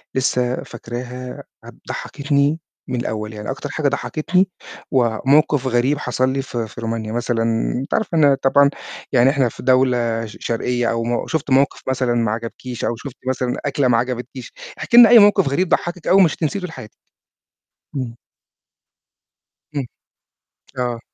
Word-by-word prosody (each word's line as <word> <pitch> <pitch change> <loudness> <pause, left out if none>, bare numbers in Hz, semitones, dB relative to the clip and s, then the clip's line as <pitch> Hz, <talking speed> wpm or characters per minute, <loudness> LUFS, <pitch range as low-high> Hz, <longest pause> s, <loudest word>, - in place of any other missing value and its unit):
لسه 125 -1 0
فاكراها 125 +2 -7 0.2
ه - - -9 0.2
ضحكتني 145 +2 0 0.3
من 125 -2 -2
الأول، 110 -1 -4
يعني 105 +2 -7
أكتر 135 - -6
حاجة 150 -3 -1
ضحكتني 175 +7 0 0.4
وموقف 135 +3 +2
غريب 130 +4 +2
حصل 130 -1 0
لي 135 +1 -1
في 120 -4 -4
في 115 - -10
رومانيا 115 -1 -3
مثلًا 115 -1 -1 0.4
أنتِ 135 - -5
عارفة 185 -6 0
إن 155 - +4
أنا 140 -1 +6
طبعًا 140 +1 +5 0.4
يعني 130 0 +5
إحنا 135 -4 +2
في - - -11
دولة 125 -3 +2
ش 105 - -11
شرقية 120 +1 -1
أو 115 0 -1
م 120 +1 -2
شُفتِ 155 -3 -2
موقف 135 +2 +3
مثلًا 130 -2 0
ما 115 -2 +1
عجبكيش 115 +2 -5
أو 120 - -1
شُفتِ 125 +2 -9
مثلًا 125 -1 -1
أكلة 140 -2 +1
ما 115 -2 +3
عجبتكيش، 125 +1 -4 0.2
احكي 235 - +1
لنا 240 -2 +10
أي 240 -2 +9
موقف 205 -6 +5
غريب 180 +6 0
ضحكِك 175 0 -1
أوي 190 - +5
ومش 165 -5 +3
هتنسيه 165 +5 -2
طول 180 -3 -6
حياتِك. 125 -8 -10 1.1
إمم. 120 -3 -3 1.6
امم. 140 -4 -3 0.9
آه. 120 -2 -1
130 Hz, 160 wpm, -20 LUFS, 120-140 Hz, 1.6 s, لنا